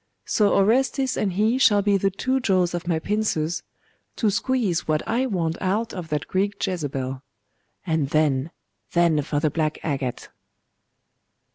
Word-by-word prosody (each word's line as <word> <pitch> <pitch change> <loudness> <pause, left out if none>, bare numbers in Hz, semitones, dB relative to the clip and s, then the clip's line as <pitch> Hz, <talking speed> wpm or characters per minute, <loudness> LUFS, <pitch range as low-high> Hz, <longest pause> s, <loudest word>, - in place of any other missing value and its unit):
So 210 -2 +2
Orestes 255 +6 +2
and 195 -3 -1
he 220 +6 +2
shall 205 -6 +5
be 205 0 +3
the 195 0 +2
two 260 +7 -1
jaws 185 -7 +1
of 175 0 -4
my 170 -2 +1
pincers, 175 -4 -1 0.5
to 215 -3 +1
squeeze 230 -5 0
what 155 -1 0
I 255 +3 +1
want 170 -7 -2
out 215 +5 -1
of 175 -4 -6
that 150 -1 -2
Greek 200 +2 0
Jezebel.. 135 -8 -3 0.6
And 160 -5 0
then, 150 -2 +1 0.4
then 170 -3 +3
for 145 0 -2
the 150 0 +1
black 155 -1 -1
agate! 135 -5 -3
180 Hz, 150 wpm, -24 LUFS, 155-210 Hz, 0.6 s, shall